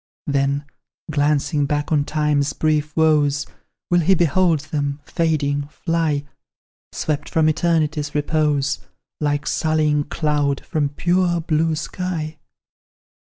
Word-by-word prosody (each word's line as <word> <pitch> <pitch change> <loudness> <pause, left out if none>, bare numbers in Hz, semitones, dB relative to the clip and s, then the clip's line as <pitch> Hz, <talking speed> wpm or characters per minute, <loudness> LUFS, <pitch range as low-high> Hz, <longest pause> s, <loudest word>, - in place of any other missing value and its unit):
"Then, 140 0 0 0.5
glancing 145 0 +1
back 145 +1 -1
on 145 -2 +2
Time's 150 -1 +1
brief 150 -1 0
woes, 150 -3 +3 0.5
Will 175 - +5
he 180 +3 +4
behold 170 -1 +2
them, 145 -1 -3
fading, 145 -4 0
fly; 160 -2 -1 0.7
Swept 150 -2 -2
from 160 -1 +2
Eternity's 155 -2 0
repose, 150 -2 +1 0.4
Like 145 -1 0
sullying 155 -2 +1
cloud 145 -3 0
from 150 -4 0
pure 175 +3 +1
blue 160 0 +1
sky? 160 -1 -4
150 Hz, 110 wpm, -21 LUFS, 145-160 Hz, 0.7 s, Will